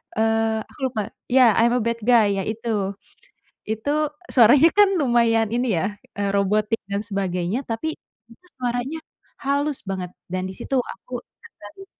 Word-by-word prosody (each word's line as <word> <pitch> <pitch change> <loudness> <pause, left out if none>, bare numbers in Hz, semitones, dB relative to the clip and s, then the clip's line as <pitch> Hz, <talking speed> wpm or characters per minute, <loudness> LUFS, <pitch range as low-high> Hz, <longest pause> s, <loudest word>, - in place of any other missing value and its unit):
eee, 225 0 +1
aku - - -20
lupa 215 -5 -4 0.2
iya 250 -2 +6
"I'm 235 +1 +4
a 250 - +1
Bad 230 0 -1
Guy" 210 -5 +4
ya - - -4
itu, 215 -3 -2 0.7
itu 220 +6 -2 0.4
suaranya 265 +7 +7
kan 410 -1 +7
lumayan 230 -3 +3
ini 245 +1 0
ya, 190 - 0 0.3
eee, 200 -1 0
robotik 210 +3 +1
dan 200 +1 0
sebagainya 195 +1 -2
tapi, 305 +8 -2 0.4
itu 360 +10 -19
suaranya 245 +4 -2 0.5
halus 285 0 0
banget 185 -2 -3 0.2
dan 185 0 -2
di - - -7
situ 270 - -2
aku 245 +3 -8 0.2
tertarik. 390 - -13
225 Hz, 150 wpm, -23 LUFS, 205-250 Hz, 0.7 s, suaranya